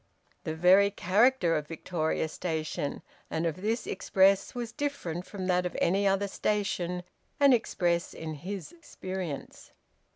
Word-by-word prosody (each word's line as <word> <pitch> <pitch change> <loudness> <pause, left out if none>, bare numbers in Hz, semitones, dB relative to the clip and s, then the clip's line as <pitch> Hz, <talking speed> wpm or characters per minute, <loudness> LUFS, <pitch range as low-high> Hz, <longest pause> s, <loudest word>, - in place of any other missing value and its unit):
The 160 - -2
very 185 +4 +6
character 200 0 +3
of 150 -1 -2
Victoria 160 -1 -2
Station 155 -3 -3 0.3
and 160 +1 -1
of 170 +2 -2
this 225 +3 -1
express 195 +2 +2
was 240 -2 -4
different 235 - -3
from 195 -3 -5
that 180 -1 +2
of 180 - -4
any 195 +3 +2
other 195 +1 +2
station 185 -4 -1 0.4
and 280 -2 +7
express 175 -7 +1
in 160 -1 -5
his 180 +5 -6
experience. 185 - -7
185 Hz, 135 wpm, -29 LUFS, 170-205 Hz, 0.4 s, and